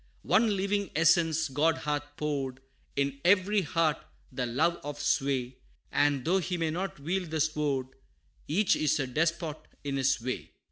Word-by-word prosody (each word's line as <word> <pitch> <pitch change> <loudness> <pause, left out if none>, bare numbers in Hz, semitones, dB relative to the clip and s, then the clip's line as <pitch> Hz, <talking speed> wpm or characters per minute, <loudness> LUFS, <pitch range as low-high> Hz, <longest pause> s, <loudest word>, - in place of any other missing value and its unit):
One 215 -2 +3
living 200 +1 0
essence 165 0 +3
God 150 +4 +2
hath 150 -1 -1 0.2
poured 140 -4 -2 0.4
In 140 0 -1
every 200 +3 +4
heart 160 -2 0 0.3
the 125 -1 -2
love 160 +8 +1
of 145 0 -6
sway 135 -3 0 0.3
And 145 -3 +2
though 185 +3 +3
he 180 0 -2
may 165 -2 0
not 185 0 -4
wield 175 +4 -2
the 160 0 -2
sword, 150 -4 0 0.6
Each 190 +7 +3
is 155 0 +1
a 135 - 0
despot 160 +3 -1 0.3
in 140 -1 -2
his 135 0 +2
way. 125 +2 -5
155 Hz, 155 wpm, -29 LUFS, 140-170 Hz, 0.6 s, every